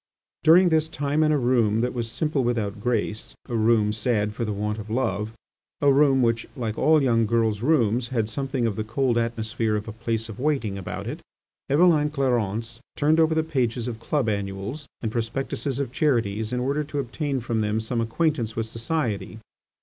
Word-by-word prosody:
During 175 Hz, +3 st, +7 dB
this 160 Hz, -1 st, +2 dB
time 145 Hz, -1 st, -1 dB
in 155 Hz, 0 st, +3 dB
a 150 Hz, -, +3 dB
room 120 Hz, -4 st, +2 dB
that 125 Hz, +1 st, -1 dB
was 120 Hz, -2 st, -3 dB
simple 150 Hz, +2 st, -1 dB
without 110 Hz, -4 st, -1 dB
grace, 110 Hz, -2 st, -2 dB
a 120 Hz, -, -3 dB
room 110 Hz, -1 st, +3 dB
sad 105 Hz, -1 st, 0 dB
for 115 Hz, -, -3 dB
the 110 Hz, -, -2 dB
want 105 Hz, +1 st, -2 dB
of 105 Hz, 0 st, -8 dB
love, 110 Hz, -3 st, -1 dB, 0.5 s
a 140 Hz, -1 st, +4 dB
room 135 Hz, -2 st, +4 dB
which, 115 Hz, -1 st, +1 dB
like 115 Hz, -5 st, -3 dB
all 155 Hz, 0 st, +4 dB
young 115 Hz, -4 st, +3 dB
girls' 110 Hz, -2 st, +1 dB
rooms, 120 Hz, -4 st, +2 dB
had 115 Hz, -3 st, -1 dB
something 135 Hz, +1 st, -2 dB
of 110 Hz, -3 st, 0 dB
the 110 Hz, -, -1 dB
cold 120 Hz, +3 st, 0 dB
atmosphere 115 Hz, -1 st, -1 dB
of 105 Hz, +1 st, -3 dB
a -, -, -4 dB
place 115 Hz, 0 st, -3 dB
of 110 Hz, 0 st, -9 dB
waiting 135 Hz, -8 st, 0 dB
about 95 Hz, -2 st, -5 dB
it, -, -, -5 dB, 0.5 s
Eveline 150 Hz, 0 st, +4 dB
Clarence 115 Hz, -5 st, -1 dB, 0.2 s
turned 155 Hz, +2 st, +3 dB
over 160 Hz, 0 st, +3 dB
the 160 Hz, -, +2 dB
pages 125 Hz, -6 st, -1 dB
of 115 Hz, -2 st, -5 dB
club 135 Hz, +1 st, -1 dB
annuals 100 Hz, +7 st, -3 dB, 0.2 s
and 110 Hz, -, -1 dB
prospectuses 130 Hz, +3 st, -2 dB
of 140 Hz, -4 st, -2 dB
charities 115 Hz, -7 st, 0 dB
in 125 Hz, -, -1 dB
order 140 Hz, +4 st, 0 dB
to 145 Hz, 0 st, -6 dB
obtain 140 Hz, +1 st, -2 dB
from 115 Hz, -2 st, -1 dB
them 105 Hz, +1 st, 0 dB
some 115 Hz, +1 st, -2 dB
acquaintance 115 Hz, -1 st, 0 dB
with 115 Hz, -, -1 dB
society. 115 Hz, -2 st, -3 dB
120 Hz, 190 wpm, -25 LUFS, 110-140 Hz, 0.5 s, During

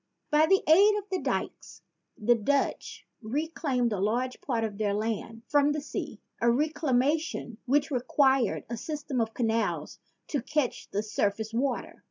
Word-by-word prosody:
By 305 Hz, +1 st, +5 dB
the 385 Hz, +2 st, +4 dB
aid 400 Hz, +7 st, +6 dB
of 410 Hz, -1 st, -5 dB
the 375 Hz, -, 0 dB
dykes -, -, -4 dB, 0.3 s
the 235 Hz, +3 st, +4 dB
Dutch 275 Hz, +5 st, -1 dB, 0.2 s
reclaimed 255 Hz, -1 st, -1 dB
a 200 Hz, -, -2 dB
large 240 Hz, +6 st, -1 dB
part 235 Hz, -4 st, -1 dB
of 210 Hz, -2 st, -4 dB
their 205 Hz, -2 st, +1 dB
land 225 Hz, +1 st, -3 dB
from 290 Hz, 0 st, +3 dB
the 305 Hz, -, -2 dB
sea, 285 Hz, -, -5 dB, 0.2 s
a 235 Hz, -, +2 dB
recla 295 Hz, +4 st, +1 dB
mation 290 Hz, -3 st, -1 dB
which 285 Hz, +4 st, +2 dB
required 265 Hz, -1 st, +2 dB
a 235 Hz, -, -4 dB
system 290 Hz, -1 st, -3 dB
of 225 Hz, 0 st, -3 dB
canals 225 Hz, -1 st, -1 dB, 0.3 s
to 285 Hz, -, -1 dB
catch 295 Hz, 0 st, -2 dB
the 205 Hz, +2 st, -2 dB
surface 215 Hz, +1 st, -1 dB
water. 250 Hz, +1 st, -2 dB
255 Hz, 160 wpm, -28 LUFS, 225-295 Hz, 0.3 s, aid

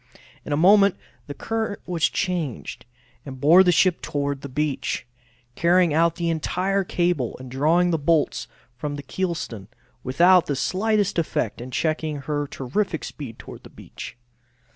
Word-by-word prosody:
In -, -, -7 dB
a 145 Hz, -, +1 dB
moment 200 Hz, +3 st, +5 dB, 0.3 s
the 145 Hz, -, -7 dB
current 225 Hz, -2 st, -3 dB
was 170 Hz, -3 st, +1 dB
changed, 170 Hz, -, -3 dB, 0.4 s
and 130 Hz, -2 st, -9 dB
bore 165 Hz, +7 st, +7 dB
the 180 Hz, -, +4 dB
ship 175 Hz, +2 st, +3 dB
toward 140 Hz, -1 st, -2 dB
the 140 Hz, -, -7 dB
beach, 145 Hz, -2 st, -2 dB, 0.5 s
carrying 170 Hz, +2 st, +3 dB
out 165 Hz, +1 st, +3 dB
the 170 Hz, -1 st, -1 dB
entire 190 Hz, +5 st, 0 dB
cable 175 Hz, -9 st, -1 dB
and 130 Hz, -1 st, -10 dB
drawing 165 Hz, +7 st, +2 dB
the 165 Hz, -, 0 dB
bolts 155 Hz, +1 st, +1 dB, 0.3 s
from 145 Hz, +3 st, -4 dB
the 145 Hz, -, -7 dB
kelson, 150 Hz, -, -4 dB, 0.4 s
without 175 Hz, +7 st, +4 dB
the 145 Hz, -, -1 dB
slightest 205 Hz, +5 st, 0 dB
effect 120 Hz, -8 st, -2 dB
in 125 Hz, -, -7 dB
checking 155 Hz, +2 st, -1 dB
her 145 Hz, 0 st, -2 dB
terrific 160 Hz, +7 st, -2 dB
speed 125 Hz, -7 st, -8 dB
toward -, -, -11 dB
the -, -, -14 dB
beach. -, -, -10 dB
160 Hz, 155 wpm, -23 LUFS, 140-180 Hz, 0.5 s, bore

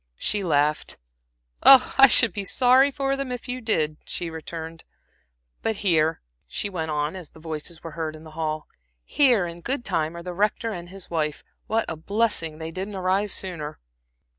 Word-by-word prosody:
She 210 Hz, -, 0 dB
laughed. 150 Hz, -3 st, +1 dB, 0.6 s
"I 270 Hz, 0 st, +8 dB
should 230 Hz, -2 st, +5 dB
be 205 Hz, -, -3 dB
sorry 255 Hz, +6 st, +4 dB
for 275 Hz, -1 st, -1 dB
them 275 Hz, -2 st, -4 dB
if 250 Hz, +1 st, -5 dB
you 250 Hz, +1 st, -4 dB
did," 155 Hz, -9 st, 0 dB
she 170 Hz, -2 st, -5 dB
returned. 160 Hz, 0 st, -7 dB, 0.8 s
"But 225 Hz, -, 0 dB
here," 160 Hz, -3 st, +3 dB, 0.3 s
she 205 Hz, -, -3 dB
went 160 Hz, -4 st, -3 dB
on, 150 Hz, +2 st, -1 dB
as 180 Hz, -5 st, -8 dB
voices 160 Hz, +1 st, -7 dB
were 165 Hz, -, -6 dB
heard 160 Hz, -1 st, -4 dB
in 155 Hz, -, -12 dB
the 160 Hz, -, -12 dB
hall, 155 Hz, -1 st, -3 dB, 0.4 s
"here, 245 Hz, -, +3 dB
in 170 Hz, 0 st, -7 dB
good 250 Hz, +4 st, -3 dB
time, 160 Hz, +1 st, -1 dB
are 170 Hz, -, -7 dB
the 180 Hz, 0 st, -5 dB
Rector 210 Hz, +4 st, 0 dB
and 175 Hz, -3 st, -7 dB
his 190 Hz, -1 st, -11 dB
wife. 155 Hz, -3 st, -1 dB, 0.2 s
What 225 Hz, +1 st, +1 dB
a 165 Hz, -, -3 dB
blessing 165 Hz, -2 st, -1 dB
they 160 Hz, 0 st, -6 dB
didn't 190 Hz, +4 st, -5 dB
arrive 190 Hz, +2 st, 0 dB
sooner!" 160 Hz, -6 st, -3 dB
175 Hz, 175 wpm, -25 LUFS, 160-220 Hz, 0.8 s, I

